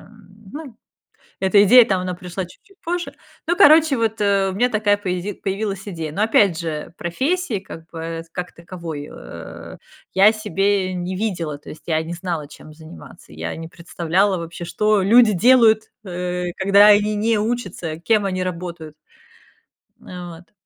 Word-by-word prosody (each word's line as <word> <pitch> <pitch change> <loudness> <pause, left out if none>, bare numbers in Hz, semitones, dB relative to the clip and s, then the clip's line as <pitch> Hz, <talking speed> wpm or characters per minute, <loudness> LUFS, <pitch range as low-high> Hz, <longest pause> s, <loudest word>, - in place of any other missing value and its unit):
м, 220 -2 -18 0.3
ну, 285 -5 -9 0.6
эта 195 +1 +4
идея 245 +4 +8
там 190 -5 0
она 180 0 -4
пришла 180 +1 -6
чуть-чуть 385 - -20
позже. 345 +1 -3 0.3
Ну, 345 - +1
короче 310 -2 +6
вот, 225 -2 -1
э, 200 -1 +2
у - - -4
меня 245 +4 +2
такая 210 -2 +2
появи 190 0 -3
появилась 195 +1 -4
идея. 165 -5 -5
Но 200 +7 -1
опять 205 -5 +3
же 165 -1 -5
профессии, 260 - -1
как 165 -4 -11
бы, 165 0 -5
как 180 0 -6
таковой, 170 -4 -8
э, 80 0 -10 0.4
я 195 +3 +7
себе 195 -2 0
не 180 +1 -4
видела, 175 -8 -3
то - - -13
есть, 155 - -11
я 160 -2 0
не 165 +2 -6
знала 170 -4 -4
чем 155 +1 -14
заниматься, 150 - -14
я 80 +1 -5
не 165 0 -7
представляла 180 +3 0
вообще 170 +1 -7
что 210 +2 +1
люди 225 +2 +6
делают, 225 +1 +5 0.2
э, 180 -1 -4
когда 200 +2 +6
они 210 0 +4
не 220 +1 +1
учатся, 190 -8 -3
кем 210 +3 +1
они 185 -1 -1
работают. 170 -3 -6 1.1
Э, 180 -1 -8
вот. 170 +1 -14
185 Hz, 165 wpm, -21 LUFS, 170-215 Hz, 1.1 s, идея